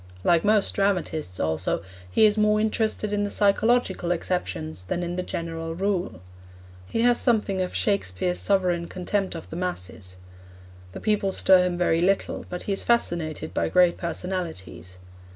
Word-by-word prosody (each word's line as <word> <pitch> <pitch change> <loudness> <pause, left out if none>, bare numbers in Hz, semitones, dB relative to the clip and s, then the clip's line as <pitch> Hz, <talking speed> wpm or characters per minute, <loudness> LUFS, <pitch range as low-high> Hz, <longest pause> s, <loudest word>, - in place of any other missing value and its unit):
Like 170 -1 +3
most 210 -1 +3
dramatists, 175 - -1
also, 80 +1 -1 0.3
he 215 - +4
is 210 -1 +4
more 210 0 +3
interested 215 -1 0
in 205 0 +1
the 205 - -1
psychological 205 -2 +2
exceptions 160 - -3
than 175 - -2
in 175 0 -3
the 180 - -1
general 165 -2 -5
rule. 185 - -2 0.7
He 225 - -1
has 245 0 +3
something 210 -6 +1
of 180 - -3
Shakespeare's 180 - 0
sovereign 180 -4 +1
contempt 185 +1 -2
of 165 - -8
the 165 - -5
masses. 95 - -5 0.8
The - - -8
people 210 -2 +1
stir 185 -1 +5
him 175 -1 -3
very 170 -2 +2
little, 195 +2 0
but 180 - -5
he 200 - -1
is 195 - -2
fascinated 165 -9 0
by - - 0
great 180 -1 +4
personalities. 160 - -5
180 Hz, 155 wpm, -25 LUFS, 165-205 Hz, 0.8 s, stir